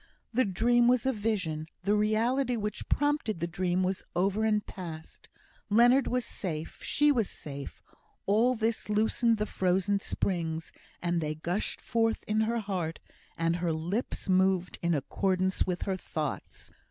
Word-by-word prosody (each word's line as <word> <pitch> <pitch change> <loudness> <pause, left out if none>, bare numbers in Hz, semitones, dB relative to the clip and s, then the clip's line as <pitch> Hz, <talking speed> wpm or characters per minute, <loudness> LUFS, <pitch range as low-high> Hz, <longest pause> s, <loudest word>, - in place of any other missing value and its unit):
The 255 +3 +3
dream 235 +5 +3
was 250 -1 +3
a 265 - +2
vision; 185 -8 -2 0.2
the 200 +2 +2
reality 230 +5 +2
which 210 -1 -4
prompted 290 - +1
the 170 - 0
dream 180 +1 0
was 185 +1 -1
over 195 +4 +1
and 210 -1 +2
past 165 -4 -8 0.4
Leonard 240 +5 +5
was 250 -1 0
safe 160 -5 -4
she 295 0 +3
was 230 -8 +1
safe; 140 -2 -8 0.4
all 230 +6 +3
this 225 -1 -1
loosened 220 +2 +2
the 210 - 0
frozen 190 +1 +1
springs, 165 -5 -2 0.3
and 175 -1 +1
they 155 0 -2
gushed 175 +6 -2
forth 225 -1 0
in 215 +1 +2
her 230 +2 +1
heart, 180 -6 -3 0.4
and 165 +1 +1
her 175 -1 0
lips 175 +12 -2
moved 185 -1 +2
in 170 -1 +2
accordance 185 +7 0
with 180 -1 -2
her 190 -1 -1
thoughts. 155 -5 -5
195 Hz, 155 wpm, -29 LUFS, 175-225 Hz, 0.4 s, Leonard